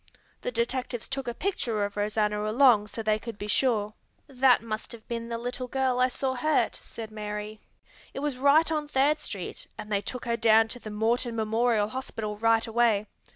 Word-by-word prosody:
The - - -3
detectives 240 0 -2
took 270 -1 -4
a 240 - -1
picture 235 - -1
of 205 - -6
Rosanna 210 0 0
along 230 -3 +5
so 225 +2 -6
they 215 0 +2
could 225 -1 -7
be 205 - -5
sure." 210 -1 +1 0.3
"That 260 -3 +3
must 215 -1 -5
have 225 -2 -12
been 230 0 -4
the 230 - -2
little 245 +2 -4
girl 260 -1 0
I 255 - +5
saw 260 +1 -1
hurt," 305 +5 +1
said 220 -1 -9
Mary. 210 0 -5 0.5
"It 275 - -6
was 295 -2 -1
right 285 +5 +4
on 305 -2 -1
Third 290 +2 +2
Street, 195 -10 -6
and 210 - -8
they 200 -1 +1
took 250 +4 -6
her 235 -1 0
down 225 0 +5
to 245 - -6
the 215 - -8
Morton 230 +3 0
Memorial 220 -1 +1
Hospital 220 -4 -4
right 225 +1 +3
away. 225 -2 +2
230 Hz, 195 wpm, -27 LUFS, 215-255 Hz, 0.5 s, along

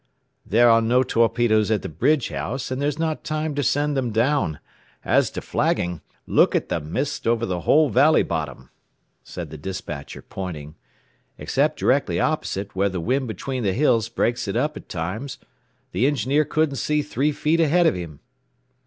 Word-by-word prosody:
"There 120 +3 +5
are 115 -1 +6
no 120 +3 +3
torpedoes 115 -3 +2
at 110 -2 0
the - - -3
bridge 135 - +1
house, 130 +2 -4
and 130 +1 -2
there's 145 -1 0
not 160 -1 -2
time 155 0 -2
to 145 - -1
send 145 +1 +1
them 130 -3 0
down. 115 - +1 0.5
As - - +3
to - - -6
flagging 90 -2 -1 0.2
look - - +3
at - - -1
the - - 0
mist 100 - -3
over 115 0 +2
the 90 -4 -2
whole 150 - +4
valley 150 +8 +4
bottom," 70 -5 -5 0.5
said 85 -4 -8
the 80 - -8
despatcher 75 -4 -6
pointing. 80 -6 -7 0.6
"Except - - 0
directly - - +1
opposite, 100 0 -2
where 100 +1 +2
the 95 -2 -4
wind 130 +9 0
between 130 +3 -4
the 100 -4 0
hills 115 -4 +2
breaks 120 0 -1
it 100 - -3
up 150 +5 0
at - - -11
times, 105 +11 -4 0.5
the 115 +9 +2
engineer 145 +2 +1
couldn't 155 -1 0
see 150 +3 0
three 145 +1 0
feet 155 +3 0
ahead 165 +2 +3
of - - +4
him." 85 -5 -7
120 Hz, 175 wpm, -23 LUFS, 95-145 Hz, 0.6 s, are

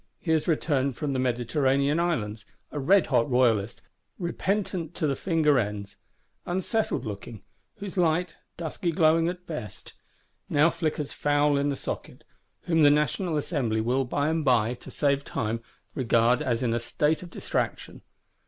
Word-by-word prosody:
He 160 - -2
is 160 -1 +2
returned 140 -5 +1
from 145 -2 -2
the 130 - -1
Mediterranean 135 +4 +1
Islands, 115 -12 -1 0.3
a 150 - -4
redhot 145 -6 +3
royalist, 115 -4 +2 0.3
repentant 185 -1 -2
to - - -1
the 140 -2 +1
finger 155 -4 +2
ends;—unsettled 125 - -4
looking; 105 +1 -7 0.3
whose 200 -3 -5
light, 170 0 +1 0.2
dusky 170 +2 -2
glowing 165 0 +3
at 180 0 -7
best, 140 - -7 0.6
now 150 +3 +4
flickers 155 -3 -2
foul 145 0 +2
in 140 +1 +1
the 140 - -1
socket; - - -6 0.4
whom 165 -2 +1
the 145 - +8
National 150 +3 +1
Assembly 130 -8 -1
will 125 +4 +1
by 145 +4 0
and 160 0 0
by, 120 -4 +3
to 125 - -12
save 140 -1 +1
time, 115 -3 -3 0.3
"regard 120 -1 +2
as 120 0 0
in 115 -2 +1
a 120 - +1
state 150 +6 0
of 180 - -9
distraction." - - -3
145 Hz, 150 wpm, -27 LUFS, 125-165 Hz, 0.6 s, the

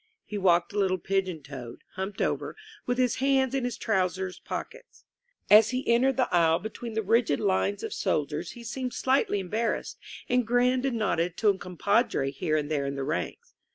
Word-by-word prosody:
He 210 - -7
walked 175 -1 +3
a 205 - -1
little 190 -2 +2
pigeon 185 -3 -2
toed, 130 -4 -9
humped 190 +2 -3
over, - - -2 0.3
with 245 0 0
his 250 -2 +1
hands 270 -1 +2
in 270 -2 0
his 245 -1 -3
trousers 190 -4 -1
pockets. - - -8 0.4
As 215 +2 +7
he 255 +1 -3
entered 255 +3 +3
the 255 -2 +2
aisle 165 -2 +4
be 220 - -5
tween 230 -2 -7
the 220 - 0
rigid 225 +4 +2
lines 200 0 0
of 445 - -4
soldiers - - -2
he 240 - -11
seemed 250 +2 -4
slightly 260 -6 +1
em 185 -2 -7
barrassed, 230 +2 -1 0.3
and 250 -2 +1
grinned 250 +2 +2
and 245 -3 -1
nodded 180 -5 0
to 215 - +3
a 195 - +2
compadre 180 - 0
here 155 +2 -1
and 150 0 -3
there 140 -2 0
in 140 - -3
the 135 - -3
ranks. 90 - -4
210 Hz, 195 wpm, -27 LUFS, 180-245 Hz, 0.4 s, As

